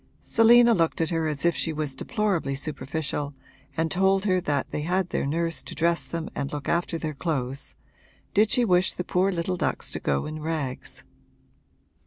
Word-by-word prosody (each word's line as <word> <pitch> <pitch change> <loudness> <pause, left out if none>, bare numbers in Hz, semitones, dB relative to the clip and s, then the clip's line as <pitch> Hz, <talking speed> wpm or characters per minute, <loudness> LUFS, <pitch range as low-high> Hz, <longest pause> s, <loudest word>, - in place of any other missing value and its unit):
Selina 235 +1 +6
looked 165 -5 +1
at 165 0 0
her 165 -1 0
as 150 0 -2
if 170 - +3
she 165 - -1
was 150 -3 -3
deplorably 200 - -1
superficial 145 0 -3 0.4
and 160 0 0
told 190 +1 +2
her 185 -2 +2
that 145 -5 -1
they - - -2
had 180 +3 0
their - - 0
nurse 165 +3 -1
to - - -9
dress 170 +1 +1
them 165 -1 -4
and 140 - -3
look 145 -2 -5
after 170 0 0
their 155 -2 -3
clothes 135 -4 -3 0.6
did 215 +1 +4
she 245 -2 +3
wish 180 -2 +3
the 180 - -4
poor 185 +2 +1
little 180 +1 -2
ducks - - -1
to - - -3
go 70 -1 0
in 155 0 -6
rags? 150 -5 -4
165 Hz, 185 wpm, -26 LUFS, 150-185 Hz, 0.6 s, Selina